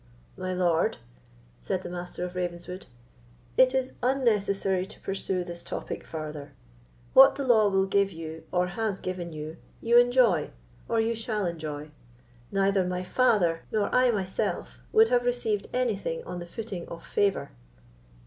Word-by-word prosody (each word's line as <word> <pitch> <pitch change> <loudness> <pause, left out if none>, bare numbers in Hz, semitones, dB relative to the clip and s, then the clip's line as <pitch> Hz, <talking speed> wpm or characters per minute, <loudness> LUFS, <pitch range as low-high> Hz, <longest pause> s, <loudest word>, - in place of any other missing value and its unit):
"My 185 0 -4
lord," 175 -3 +1 0.6
said 185 -1 -2
the - - -6
Master 180 0 -5
of 180 - -7
Ravenswood, 180 +1 -5 0.7
"it 260 0 +5
is 260 -1 0
unnecessary 205 -7 +1
to 210 - -11
pursue 190 -1 -2
this 175 -1 -7
topic - - -5
farther. 150 -2 -6 0.6
What - - +9
the 280 - -3
law 225 -5 +5
will 195 -1 +2
give 195 0 +2
you, 160 -1 -7
or 180 0 +2
has 195 +2 -2
given 180 -2 -4
you, 155 +1 -7 0.2
you 235 +1 +5
enjoy—or 195 - +1
you 225 +1 +2
shall 220 -3 -2
enjoy; 155 -3 -5 0.6
neither 195 -1 +2
my 180 0 -2
father 185 -6 +2
nor 215 -2 0
I 250 0 +5
myself 190 -5 -2
would 445 0 +6
have 245 0 +3
received 240 -4 -1
anything 215 -9 -1
on 180 0 -6
the 175 - -7
footing 195 -2 -6
of 170 - -9
favour." 200 -1 0
190 Hz, 150 wpm, -27 LUFS, 175-225 Hz, 0.7 s, What